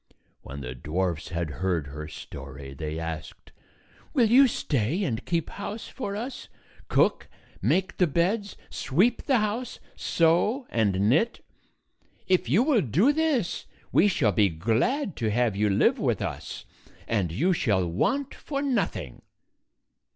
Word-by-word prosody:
When 70 +1 -8
the 65 -2 -5
dwarfs 85 +5 -2
had 85 -2 -3
heard 85 +1 -1
her 75 +2 -7
story, 70 -2 -9
they 75 +2 -5
asked, 80 -1 -6 0.6
"Will 245 -4 +5
you 270 +3 +8
stay 145 - -1
and 115 -11 -2
keep 170 -3 -1
house 205 +2 -6
for 200 -7 -5
us 245 +5 -6 0.2
— - - -26
cook, - - +2 0.3
make 190 +2 +1
the 180 - +4
beds, 190 +7 0
sweep 200 - +1
the 265 -3 +4
house, 220 +3 -2 0.2
sew 175 - +2
and 100 -3 +2
knit? 165 - +2 0.8
If 185 -10 +2
you 185 - +4
will 270 -6 +3
do 180 - +3
this, 295 - 0 0.2
we 200 - +5
shall 130 - +2
be 100 +1 +3
glad 120 - 0
to 110 -3 0
have 115 -1 +1
you 105 +1 +2
live 100 - +3
with - - +1
us, - - -5 0.4
and 100 -7 0
you 170 - +2
shall 100 - +1
want 270 - 0
for 280 -1 -4
nothing." 180 - -2
135 Hz, 145 wpm, -27 LUFS, -, 0.8 s, you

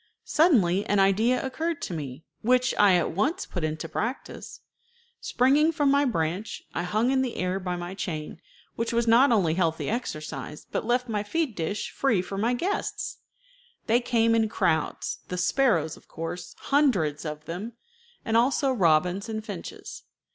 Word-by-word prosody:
Suddenly 205 - +3
an 205 - +2
idea 215 +7 +3
occurred 320 +4 -2
to - - -4
me, 145 -2 -6 0.2
which 250 +2 +3
I 200 -3 +6
at 175 - +1
once 295 - 0
put 175 - -5
in 155 0 -1
practice. 220 - -5 0.6
Springing 285 +6 +3
from 295 -4 +2
my 280 +1 +3
branch, 185 - -2
I - - -1
hung 215 +8 +1
in 265 -1 +2
the 255 -2 -2
air 185 +1 -1
by 180 -1 -3
my 175 +1 -5
chain, 160 -4 -5 0.3
which 230 0 -2
was 235 0 +2
not 240 +4 +5
only 185 -8 +3
healthy 160 -4 0
exercise, 155 -9 -5
but - - -2
left 245 +1 +1
my 215 -3 -1
feed 300 +5 -1
dish 175 +5 -3
free 230 -10 +1
for 195 - -6
my 235 +4 +1
guests. 375 +10 -3 0.7
They 230 +2 +3
came 230 -2 +2
in 225 -1 +2
crowds, 160 -7 -1
the 180 - -4
sparrows 180 - +2
of - - -19
course, 165 +2 -6
hundreds 205 - +1
of 150 -1 -6
them, 195 +8 -5 0.5
and 225 - 0
also 265 +3 +3
robins 180 +1 +2
and 220 -1 -4
finches. - - -8
210 Hz, 165 wpm, -26 LUFS, 175-250 Hz, 0.7 s, I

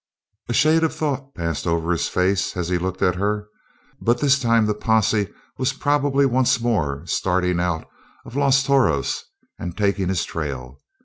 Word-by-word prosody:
A - - 0
shade 155 +7 +4
of 160 - 0
thought 140 -2 -3
passed 85 -1 -3
over 85 0 0
his 85 - 0
face 95 +1 0
as 90 -1 -2
he 90 -1 +1
looked 95 +1 -3
at 90 - +3
her. 105 +2 -1 0.5
But 120 +1 +2
this 140 -1 +3
time 115 -3 +3
the 105 - +1
posse 110 -1 +1 0.3
was 130 0 +1
probably 145 0 +2
once 130 -1 +2
more 85 -11 -1
starting 90 -1 0
on 85 -2 0
out - - -22 0.4
of 120 - -11
Los 140 -1 +3
Toros 130 - +1 0.4
and 85 0 -6
taking 100 -3 +1
his 95 -2 0
trail. 70 -4 -5
105 Hz, 175 wpm, -22 LUFS, 90-130 Hz, 0.5 s, shade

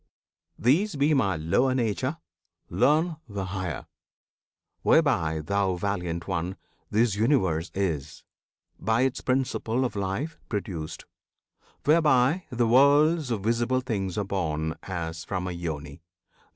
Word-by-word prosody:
These 165 - +2
be 145 +2 +3
my 100 -10 +2
lower 125 +12 +2
Nature; 130 +5 -1 0.5
learn 155 +3 +2
the 100 -2 -3
higher, 95 -4 -4 1.0
Whereby, 80 0 +3
thou 100 +2 0
Valiant 90 -3 -3
One! 95 0 -2 0.3
this 110 0 +2
Universe 95 - +1
Is, 80 -7 -2 0.6
by 110 +2 +1
its 130 0 0
principle 130 -1 0
of 120 - -3
life, 100 +11 -3
produced; 90 -7 -4 0.8
Whereby 150 +1 +4
the 120 -1 +1
worlds 145 +4 +5
of 110 -5 -2
visible 120 +3 +1
things 100 -8 -3
are 105 - +1
born 80 -5 -1
As 85 -3 -5
from 90 0 -3
a - - -2
Yoni. 80 -3 -5
100 Hz, 120 wpm, -27 LUFS, 90-130 Hz, 1.0 s, worlds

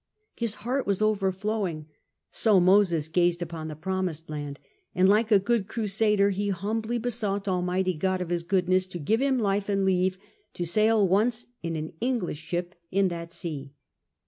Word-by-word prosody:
His 230 -2 -2
heart 260 +2 -1
was 200 -2 +1
overflowing 195 -4 0 0.2
— - - -56
sp 215 -3 +4
Moses 180 -4 +4
gazed 175 +1 +2
upon 165 -2 -6
the 155 - -6
promised 175 -1 -3
land 145 -1 -5 0.2
— 390 -3 -44
and 185 +1 +4
like 215 +3 +4
a 205 - +8
good 200 0 0
crusader 210 -2 +2
he 200 +1 -1
humbly 220 +5 -2
besought 215 -4 -2
Almighty 185 0 0
God 185 +3 -1
of 180 -2 -4
His 175 -1 0
goodness 185 +1 +1
to 185 - -6
give 215 - 0
him 270 -1 +2
life 200 -2 0
and 195 -1 +1
leave 185 0 +2 0.4
to 175 - -2
sail 215 +3 +3
once 220 +6 +1 0.2
in 165 -1 -3
an 155 0 -5
English 235 - -1
ship 175 +2 -3 0.2
in 195 0 +2
that 170 -1 -6
sea. 145 -6 -6
190 Hz, 175 wpm, -27 LUFS, 175-215 Hz, 0.4 s, a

